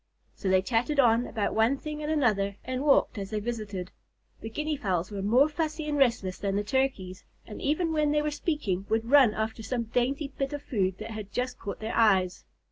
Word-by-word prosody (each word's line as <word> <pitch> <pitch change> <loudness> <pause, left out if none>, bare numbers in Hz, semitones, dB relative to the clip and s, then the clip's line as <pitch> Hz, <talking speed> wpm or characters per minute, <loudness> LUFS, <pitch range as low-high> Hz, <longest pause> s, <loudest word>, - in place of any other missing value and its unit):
So 195 - -3
they 185 0 +4
chatted 245 +7 0
on 240 -1 +4
about 215 -3 -2
one 225 +5 +3
thing 300 +1 -6
and 300 +1 -2
another, 210 -10 +1
and 255 0 -3
walked 275 -5 +3
as 195 -1 -5
they 215 0 -2
visited. 210 -5 -5 0.5
The 225 - -6
Guinea 300 +6 -2
Fowls 185 - -2
were 200 -1 -4
more 240 +9 +4
fussy 310 0 -3
and 295 - -1
restless 230 -9 +1
than 195 -1 -1
the 205 - 0
Turkeys, 210 -7 -1 0.2
and 210 - -9
even 320 +3 0
when 300 -1 +2
they 300 0 +2
were 300 - -1
speaking 265 - -2
would 225 +2 0
run 265 -7 +6
after 220 +1 -3
some 235 +2 -2
dainty 255 +5 -1
bit 275 +1 -2
of 290 0 -5
food 190 -9 -1
that 220 +1 -7
had 215 -2 -7
just 250 +3 -3
caught 200 - -6
their 220 +1 -3
eyes. 190 -5 +3
230 Hz, 210 wpm, -28 LUFS, 205-285 Hz, 0.5 s, run